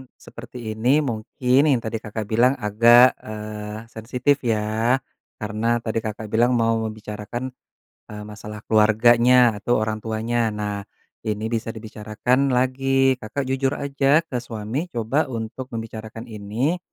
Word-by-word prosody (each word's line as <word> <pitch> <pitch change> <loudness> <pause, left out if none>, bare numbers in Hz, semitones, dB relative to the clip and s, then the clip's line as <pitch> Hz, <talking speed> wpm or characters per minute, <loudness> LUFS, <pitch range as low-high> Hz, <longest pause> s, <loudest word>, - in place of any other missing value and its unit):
seperti 120 +1 -11 0.2
ini, 130 +7 +3
mungkin 125 +1 0
yang 130 -5 +3
tadi 110 0 -3
Kakak 110 0 -5
bilang 120 +4 +4
agak, 120 +4 +6
eee, 105 0 -7
sensitif 125 +5 0
ya, 110 +3 +1 0.4
karena 110 +2 0
tadi 115 0 -1
Kakak 110 0 -5
bilang 120 +3 +3
mau 115 -1 +2
membicarakan, 110 +3 -5 0.7
eee, 105 - -7
masalah 105 0 -9
keluarganya 115 +2 +5
atau 120 +4 +1
orang 110 0 -1
tuanya, 115 +1 -1
nah, 105 -1 -4 0.4
ini 105 0 -2
bisa 115 0 -2
dibicarakan 110 +5 -1
lagi, 135 +1 +2
Kakak 110 +6 -3
jujur 135 +1 0
aja 140 +2 +2
ke 130 -6 -4
suami 120 +6 -4
coba 120 +3 0
untuk 115 +1 -5
membicarakan 115 0 -7
ini, 110 - -1
115 Hz, 130 wpm, -23 LUFS, 110-125 Hz, 0.7 s, agak